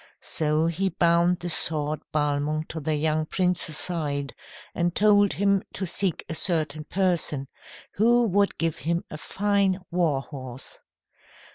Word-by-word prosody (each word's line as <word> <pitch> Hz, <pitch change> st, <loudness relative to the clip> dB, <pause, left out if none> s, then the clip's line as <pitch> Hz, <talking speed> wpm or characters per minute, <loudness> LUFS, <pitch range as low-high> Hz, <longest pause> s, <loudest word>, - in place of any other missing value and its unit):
So 155 Hz, 0 st, 0 dB
he 175 Hz, +4 st, 0 dB
bound 170 Hz, +1 st, +2 dB
the 175 Hz, -, -3 dB
sword 155 Hz, -1 st, +3 dB
Balmung 150 Hz, +1 st, -1 dB
to 160 Hz, -, -5 dB
the 155 Hz, +1 st, -1 dB
young 155 Hz, +1 st, 0 dB
prince's 180 Hz, -4 st, 0 dB
side, 145 Hz, -5 st, -1 dB, 0.4 s
and 175 Hz, 0 st, -1 dB
told 205 Hz, -1 st, +4 dB
him 200 Hz, -1 st, +2 dB
to 190 Hz, -, -3 dB
seek 185 Hz, -1 st, -1 dB
a -, -, -4 dB
certain 155 Hz, -3 st, 0 dB
person, 170 Hz, -7 st, 0 dB, 0.5 s
who 235 Hz, +3 st, +3 dB
would 200 Hz, +2 st, +1 dB
give 165 Hz, -1 st, -1 dB
him 170 Hz, +2 st, -2 dB
a 155 Hz, -, -7 dB
fine 200 Hz, -1 st, 0 dB
war 165 Hz, -6 st, +1 dB
horse. 130 Hz, -3 st, -7 dB
165 Hz, 140 wpm, -25 LUFS, 150-190 Hz, 0.5 s, told